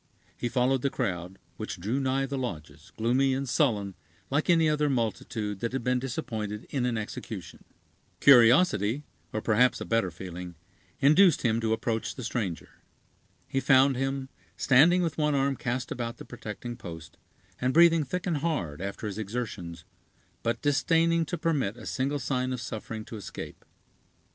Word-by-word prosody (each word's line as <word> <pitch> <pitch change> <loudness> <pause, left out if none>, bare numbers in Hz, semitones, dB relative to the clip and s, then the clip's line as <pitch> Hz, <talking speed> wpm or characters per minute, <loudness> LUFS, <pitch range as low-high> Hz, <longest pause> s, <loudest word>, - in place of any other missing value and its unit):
He 120 - -3
followed 130 +1 +2
the 140 - +1
crowd, 95 -7 -3 0.2
which - - -5
drew 110 +9 -1
nigh 135 0 +1
the 140 +1 -4
lodges, 85 - -6
gloomy 130 +4 +2
and 135 +1 -3
sullen, 110 - +1 0.4
like 145 +5 0
any 165 -2 +5
other 150 -1 +2
multitude 110 -4 -2
that 115 +3 -3
had 135 - -2
been 125 +1 +1
disappointed 115 -5 -4
in 125 -3 0
an 120 -2 -1
execution. 105 -4 -7 0.6
Curiosity, 125 - +5 0.3
or 110 - -3
perhaps 120 +3 +3
a - - -5
better 115 -5 +1
feeling, 90 0 -8 0.5
induced 155 +4 +5
him 115 -1 +2
to 110 -1 0
approach 110 0 -1
the 125 - -7
stranger. 105 -7 -3 0.8
He 135 - 0
found 135 0 +5
him, 135 +1 -2 0.3
standing 175 +8 +5
with 165 -2 -2
one 150 -1 +2
arm 135 0 +1
cast 125 0 -3
about 120 -1 -4
the - - -10
protecting 120 +1 -7
post, 80 -2 -9 0.4
and 125 +1 +1
breathing 165 +1 +6
thick 175 +6 -4
and 170 -4 0
hard, 115 - -2
after 100 +3 -5
his 105 0 -4
exertions, 100 -6 -5 0.6
but 115 - -2
disdaining 165 +3 +3
to 175 - -3
permit 145 - 0
a 120 - -10
single 140 +3 -1
sign 130 -1 -1
of 125 - -4
suffering 110 -1 -6
to 115 - -8
escape. 105 - -8
125 Hz, 165 wpm, -28 LUFS, 110-140 Hz, 0.8 s, breathing